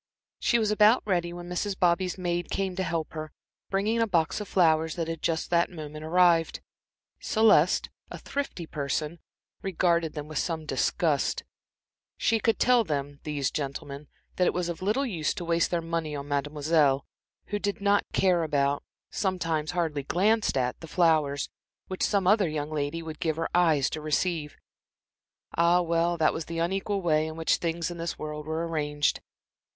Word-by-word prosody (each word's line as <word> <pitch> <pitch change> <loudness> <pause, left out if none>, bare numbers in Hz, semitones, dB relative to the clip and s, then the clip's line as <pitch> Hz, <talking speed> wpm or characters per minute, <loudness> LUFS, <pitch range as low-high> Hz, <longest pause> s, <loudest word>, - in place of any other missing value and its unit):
She 235 - +3
was 215 -2 +1
about 210 +3 +5
ready 175 -4 0
when 175 0 -8
Mrs. 185 +2 -2
Bobby's 180 +1 +1
maid 175 -1 -2
came 190 -2 -2
to 190 - -2
help 165 -3 -2
her, 155 -1 -6 0.4
bringing 210 +4 +1
a 225 - +2
box 170 0 +1
of 210 - -6
flowers 160 -3 +3
that 165 -2 -2
had 165 -1 -4
just 160 0 -1
that 170 0 +3
moment 155 -3 -8
arrived. 170 0 +3 0.6
Celeste, 210 -7 +3 0.2
a - - -7
thrifty 280 -11 -4
person, 150 +2 -3 0.4
regarded 170 -4 +1
them 150 -1 -6
with 155 -2 -3
some 160 -2 -2
disgust. - - 0 0.7
She 225 - +2
could 225 +1 +1
tell 245 -2 +4
them, 145 -4 -3
these 145 -3 -1
gentlemen, 140 0 -5 0.3
that 180 - +3
it - - 0
was 175 -1 -1
of 170 - -5
little 215 +9 +1
use 170 - -1
to 175 - -5
waste 170 0 +2
their 170 -2 -1
money 165 -2 -2
on 140 0 -6
Mademoiselle, 145 0 +1 0.4
who 205 - -1
did 200 -1 -2
not 200 0 +1
care 180 -3 +3
about, 145 -3 0 0.3
sometimes 165 -5 -1
hardly 165 -5 -1
glanced 205 +6 +1
at, 125 -1 -1
the 165 - -9
flowers 155 -5 +2 0.4
which 185 - -6
some 200 -3 +2
other 195 -2 +4
young 150 0 -3
lady 155 +2 -2
would 160 -1 -7
give 160 -2 0
her 165 +1 -2
eyes 160 -6 +3
to 155 - -4
receive. 155 0 -1 1.0
Ah, 170 +1 +4
well, 170 +1 +1
that 160 -1 +3
was 160 - -4
the 165 - -6
unequal 195 +3 -1
way 155 -2 +2
in 160 - -6
which 165 0 +1
things 170 0 -2
in 170 - -8
this 170 0 -3
world 150 0 -6
were 160 +1 -2
arranged. 150 -2 0
165 Hz, 175 wpm, -27 LUFS, 155-180 Hz, 1.0 s, about